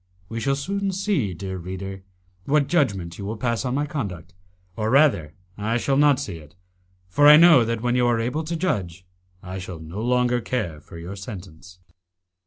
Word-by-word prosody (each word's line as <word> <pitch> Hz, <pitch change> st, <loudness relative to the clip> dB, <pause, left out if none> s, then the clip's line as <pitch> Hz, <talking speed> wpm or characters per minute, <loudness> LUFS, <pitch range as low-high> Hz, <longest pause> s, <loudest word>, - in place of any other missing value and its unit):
We 115 Hz, -, -4 dB
shall 135 Hz, +3 st, +1 dB
soon 195 Hz, +7 st, -2 dB
see, 185 Hz, -, -1 dB
dear 95 Hz, +1 st, -5 dB
reader, 95 Hz, +2 st, -6 dB, 0.4 s
what 145 Hz, 0 st, +3 dB
judgment 100 Hz, -, 0 dB
you 100 Hz, -, -5 dB
will 110 Hz, +2 st, -4 dB
pass 115 Hz, +1 st, -1 dB
on 125 Hz, -1 st, -1 dB
my 145 Hz, +1 st, 0 dB
conduct, 95 Hz, -, -5 dB, 0.4 s
or 110 Hz, 0 st, -1 dB
rather 120 Hz, -, +3 dB, 0.2 s
I 110 Hz, +3 st, 0 dB
shall 135 Hz, +3 st, 0 dB
not 145 Hz, -1 st, +4 dB
see 115 Hz, -12 st, -5 dB
it, 75 Hz, +1 st, -15 dB, 0.5 s
for 145 Hz, +11 st, +4 dB
I 150 Hz, 0 st, +10 dB
know 165 Hz, -6 st, +7 dB
that 115 Hz, -1 st, -2 dB
when 120 Hz, 0 st, 0 dB
you 125 Hz, -1 st, +3 dB
are 120 Hz, -1 st, +2 dB
able 125 Hz, +8 st, -1 dB
to 170 Hz, +2 st, -3 dB
judge, 95 Hz, -, -2 dB, 0.4 s
I 95 Hz, +1 st, -6 dB
shall 90 Hz, -2 st, -7 dB
no 80 Hz, +6 st, -7 dB
longer 125 Hz, 0 st, +1 dB
care 95 Hz, -12 st, -3 dB
for 85 Hz, -, -12 dB
your 85 Hz, +4 st, -7 dB
sentence. 90 Hz, -3 st, -10 dB
115 Hz, 190 wpm, -23 LUFS, 95-140 Hz, 0.5 s, I